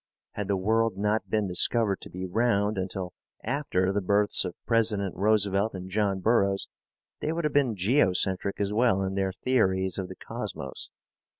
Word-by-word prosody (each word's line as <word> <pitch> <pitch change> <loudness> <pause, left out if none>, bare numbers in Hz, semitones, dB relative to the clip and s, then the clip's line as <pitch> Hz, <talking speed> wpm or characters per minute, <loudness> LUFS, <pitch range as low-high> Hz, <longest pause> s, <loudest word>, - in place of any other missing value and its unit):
Had 105 -2 -4
the 100 -1 +1
world 110 +2 +1
not 105 +2 0
been 105 -2 +1
discovered 100 +3 +2
to - - -5
be 90 +1 -5
round 105 +1 +1
until 95 -1 -4 0.3
after 110 -8 0
the 100 - 0
births 100 +2 +2
of 90 - -5
President 110 -5 +1
Roosevelt 100 +1 +1
and 95 0 -7
John 100 -2 0
Burroughs, 100 -3 +2 0.5
they 155 - -2
would 170 +1 -2
have 150 - 0
been 135 -6 +2
geocentric 95 -3 +1
as 100 0 -1
well 105 -4 +2
in 95 0 -2
their 95 -1 0
theories 95 -4 0
of 95 - -3
the 95 - -9
Cosmos. 65 - -6
100 Hz, 170 wpm, -27 LUFS, 95-110 Hz, 0.5 s, discovered